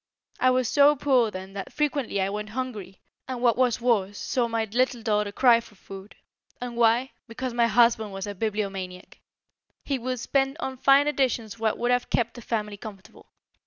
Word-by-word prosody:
I 255 - +4
was 255 -1 +2
so 285 +2 +5
poor 260 -5 +2
then 190 -1 -8
that 195 -1 -6
frequently 285 -8 -1
I 190 +1 0
went 210 +1 -5
hungry, 215 -6 -6 0.3
and 255 -2 -4
what 240 -2 +3
was 250 -2 +1
worse 205 -5 +1
saw 245 -3 -1
my 230 -1 -1
little 240 +2 0
daughter 210 -2 0
cry 235 +1 +5
for 225 -2 -15
food. 195 +1 -11 0.4
And 245 -1 -6
why? 235 +3 +3 0.2
Because 245 +2 -5
my 235 -1 +3
husband 230 -1 +3
was 195 0 -5
a 205 - -5
bibliomaniac. 195 -3 -4 0.7
He 275 -2 -1
would 255 +1 -3
spend 270 +3 0
on 265 -5 -4
fine 275 +3 +5
editions 245 -7 -1
what 220 -1 0
would 240 +1 0
have 245 0 0
kept 235 -1 0
the 240 - -10
family 210 -2 -3
comfortable. 200 -2 -12
230 Hz, 185 wpm, -26 LUFS, 210-255 Hz, 0.7 s, so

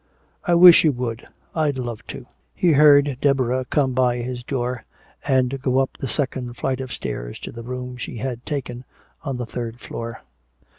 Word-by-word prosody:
"I 175 - +2
wish 175 0 +9
you 155 - +4
would. 120 -2 -4 0.3
I'd 150 -4 0
love 120 -3 -5
to." - - -8 0.3
He 175 - +3
heard 145 -2 +5
Deborah 130 -2 +1
come 135 0 +1
by 125 -1 +2
his 120 0 -5
door 125 -2 -3 0.4
and 130 0 +1
go 130 -1 +1
up 135 0 +1
the 135 - -4
second 125 -3 -2
flight 130 0 -1
of 130 -1 -6
stairs - - -5
to - - -6
the 115 - -8
room 125 +1 -6
she 120 - -6
had 125 0 -4
taken 130 -4 -4 0.4
on 135 -4 -4
the 125 - -3
third 120 0 -6
floor. 115 -2 -7
125 Hz, 180 wpm, -22 LUFS, 120-135 Hz, 0.4 s, wish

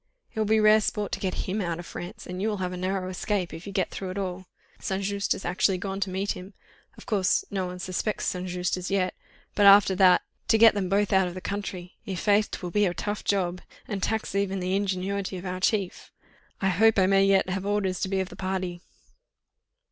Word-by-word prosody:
It - - -5
will 215 - +2
be 220 +1 +4
rare 215 0 +6
sport 210 -1 -2
to - - -2
get 185 -2 -2
him 200 +3 -1
out 170 -3 -2
of 175 - -8
France, 195 +7 -8
and 180 +1 -5
you 210 - +1
will 210 -2 -1
have 180 -1 -3
a - - -5
narrow 185 +1 -2
escape, 185 0 -2
if 165 +5 -9
you - - -5
get 190 -2 -1
through 190 - -5
at 185 - -5
all. 185 -1 -4 0.3
St. 195 +1 -2
Just 200 0 0
has - - -8
actually 185 +2 +2
gone 195 +1 -4
to 195 -1 -1
meet 190 +2 -1
him—of 190 +2 -12
course, 205 -6 +1
no 190 -2 -1
one 180 0 -6
suspects 185 +3 -2
St. 180 0 -2
Just 180 +1 -1
as 180 0 -5
yet; 185 -2 +1 0.4
but 205 -1 +5
after 200 -1 +8
that... 185 -1 +5 0.2
to 225 - +4
get 225 0 +8
them 195 -3 -2
both 200 +1 +2
out 190 -1 +4
of 175 - -6
the - - -4
country! 190 -2 -5
I'faith, 205 +2 +2
'twill 180 -2 -5
be 205 +1 +3
a 175 - -2
tough 205 0 -3
job, 180 -3 0 0.3
and 200 -2 -3
tax 220 +1 -1
even 195 -1 0
the 185 +1 -1
ingenuity 195 0 -2
of 180 - -8
our 185 0 -3
chief. 195 -1 -1 0.5
I 195 - +2
hope 220 +5 +4
I 190 - +5
may 195 +1 +4
yet 195 -1 +4
have 190 +1 -2
orders 195 -3 0
to 190 - -2
be 195 0 0
of 190 - -4
the - - -10
party." 185 -2 -3
190 Hz, 230 wpm, -26 LUFS, 185-200 Hz, 0.5 s, after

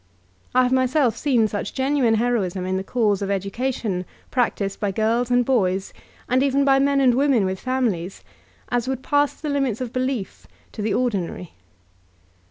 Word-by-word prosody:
I 255 - +6
have 250 - +1
myself 260 -2 +2
seen 240 -4 +2
such 205 -1 -5
genuine 265 -4 +2
heroism 215 -6 0
in 185 0 -1
the 190 - -2
cause 210 -3 0
of 200 - -2
education 200 0 -2 0.3
practiced 205 -5 -1
by 205 - 0
girls 225 +4 0
and 245 0 +3
boys, 195 -7 0 0.3
and 255 +1 +2
even 275 0 +2
by 270 -1 +4
men 280 0 +2
and 260 -3 +4
women 265 -5 +3
with 190 0 -3
fami 255 -2 +1
lies, 175 +1 -7 0.5
as 245 0 -1
would 260 0 -3
pass 290 0 +1
the 300 - -4
limits 275 -6 0
of 250 -2 -5
belief 255 -5 -3 0.2
to 215 - -7
the 210 -1 0
ordinary 210 -9 -1
mind. 180 - -9
245 Hz, 180 wpm, -22 LUFS, 200-260 Hz, 0.5 s, I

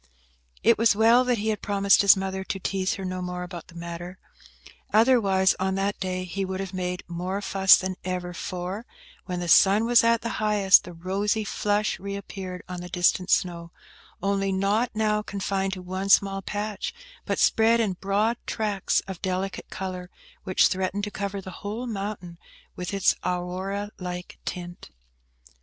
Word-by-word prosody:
It 230 - +4
was 230 -2 +4
well 230 +3 +5
that 250 -1 +1
he 215 +1 -1
had 215 -2 -1
promised 200 -1 +3
his 200 -1 +7
mother 190 0 -3
to 195 - -4
teaze 190 0 -1
her 195 - -6
no 185 0 -3
more 180 0 -4
about 175 -2 -8
the 170 - -16
matter. 170 +2 -7 0.7
Otherwise, 210 -5 +4
on 190 0 0
that 195 +1 -1
day, 185 -1 -2
he 185 +2 -3
would 190 0 -4
have 195 -1 -5
made 180 -1 -3
more 180 +3 -3
fuss 195 -1 +5
than 185 0 -3
ever, 180 -1 -3
for, 185 +6 -5 0.4
when 180 -2 -3
the 175 - -3
sun 200 +5 +6
was 240 0 +5
at 230 0 +3
the 230 - -3
highest, 205 -2 +5
the 180 - -9
rosy 200 +5 -1
flush 210 +1 -1
re 200 +1 -5
appeared 190 -2 -7
on 180 -1 -6
the 180 - -8
distant 180 +1 +1
snow, 170 -3 +1 0.5
only 195 0 +1
not 200 +5 +1
now 215 -1 +1
confined 195 -1 -2
to 185 -1 -7
one 185 +2 -4
small 195 0 +4
patch, 210 - -4 0.3
but - - 0
spread 225 +1 +4
in 215 -5 +1
broad 205 +5 0
tracts 205 -3 0
of 190 -3 -9
delicate 190 0 -3
colour, 185 -1 -5 0.4
which 185 -2 +3
threatened 190 +2 0
to 210 - -3
cover 200 -1 -4
the 190 - -8
whole 215 +5 -4
mountain 195 -6 -5 0.4
with 180 -1 -5
its 195 -2 +3
Aurora 185 +3 -3
like 180 -1 -6
tint. 175 - -6
195 Hz, 175 wpm, -25 LUFS, 180-205 Hz, 0.7 s, his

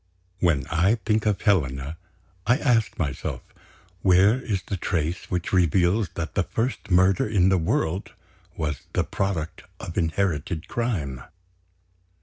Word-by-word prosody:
When 80 -7 +2
I 90 +7 +3
think 110 0 +1
of 105 -2 +1
Helena, 75 - +1 0.5
I 120 +3 +5
ask 120 -7 +1
myself, 70 -6 -3 0.6
where 95 +6 +4
is 100 -7 -2
the 100 - -3
trace 85 -2 -2
which 90 0 -2
reveals 90 +3 +3
that 85 0 -4
the 100 - +2
first 115 +3 -2
murder 95 +2 +4
in 95 -4 +4
the 95 -1 +3
world 80 +2 -1 0.4
was 75 -3 -2
the - - +2
product 90 -5 -3 0.2
of 85 +2 -4
inherited 80 -2 -1
crime? 85 - -2
90 Hz, 130 wpm, -25 LUFS, 80-100 Hz, 0.6 s, I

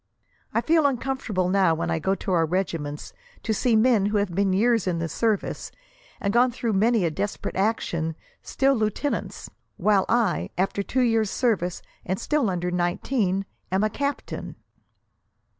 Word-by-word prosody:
I - - +1
feel 320 -2 +3
uncomfortable 250 -8 -1
now 185 -3 +3
when 165 - -2
I 160 - 0
go 190 +5 +1
to 195 - -4
our 165 -3 +3
regiments, 160 -5 -3 0.3
to 220 - 0
see 230 +2 +2
men 220 -3 +4
who 210 +1 0
have 200 -3 0
been 195 +1 +1
years 225 +1 +2
in 175 -2 0
the 165 0 -2
service, 215 +4 -1 0.5
and 200 - -1
gone 245 +2 +5
through 235 -2 -2
many 215 0 +3
a 165 - 0
desperate 205 +6 -3
action, 175 -6 -1 0.3
still 275 +1 +1
lieutenants; 220 +4 -2 0.3
while 205 -3 +3
I, 230 -5 +1
after 195 +2 0
two 255 +5 0
years' 225 -3 +2
service, 195 -9 0 0.2
and 185 +1 -2
still 295 -8 +1
under 180 -1 -2
nineteen, 190 +3 0 0.3
am 190 +2 +2
a 215 - +1
captain." 280 +4 -4
200 Hz, 160 wpm, -25 LUFS, 180-235 Hz, 0.5 s, gone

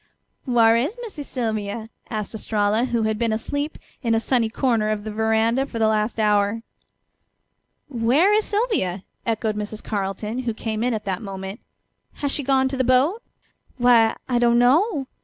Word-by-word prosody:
"Whar' 230 -2 +5
is 295 - -1
Missy 410 -10 -7
Sylvia?" 220 -4 -3 0.2
asked 215 -1 -4
Estralla, 215 +1 +1
who 235 -3 0
had 220 0 -1
been 230 -2 +1
asleep 285 +7 -3 0.2
in 230 -4 +1
a - - +3
sunny 230 -1 +1
corner 225 -3 +1
of 215 -1 -2
the 215 - -5
veranda 225 +4 +1
for 235 - -7
the 225 - +2
last 215 +1 0
hour. 210 +1 +2 1.2
"Where 270 - +3
is 430 0 +3
Sylvia?" 405 - 0 0.2
echoed 220 -1 0
Mrs. 210 +1 -5
Carleton, 210 +3 -3
who 240 -3 -2
came 220 0 -3
in 245 -1 +1
at 215 0 -5
that 190 -2 -2
moment. 195 0 -6 0.5
"Has 285 -1 -3
she 290 - -1
gone 265 -1 +2
to 265 - -4
the 260 - +2
boat?" 265 - +3 0.6
"Why, 240 -2 +5
I 245 -2 +1
don't 235 0 +4
know. 280 - +3
230 Hz, 170 wpm, -23 LUFS, 215-260 Hz, 1.2 s, Whar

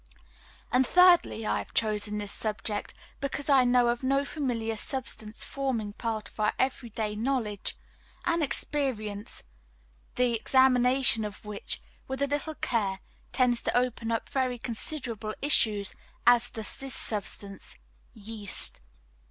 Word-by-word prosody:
And 255 +1 +4
thirdly, 355 -11 +5
I - - +1
have - - -9
chosen 210 -1 0
this 205 -1 -3
subject 215 -1 -3 0.2
because 280 +1 -2
I 265 -2 +7
know 245 -1 +4
of 240 0 -1
no 275 +2 +1
familiar 235 -7 -2
substance 220 -2 -1
forming 245 -7 -2
part 220 -2 -3
of - - -19
our 210 - +2
every 260 -2 -1
day 215 -1 -3
knowledge 220 -3 -1 0.5
and 335 -1 +2
experience, 235 -8 -2 0.7
the 250 -1 +2
examination 255 0 +4
of 210 0 -7
which, 210 -1 -4 0.2
with 265 +1 -2
a - - +2
little 290 +2 -2
care, 200 -8 -1 0.3
tends 250 -2 +2
to - - +1
open 240 -2 0
up 230 - -1
such - - -7
very 255 -2 0
considerable 230 -2 -3
issues 215 -8 +3 0.3
as 245 0 +5
does 220 -2 -3
this 270 -1 -1
substance 200 - -2 0.4
yeast. 210 -1 -1
235 Hz, 135 wpm, -28 LUFS, 215-265 Hz, 0.7 s, I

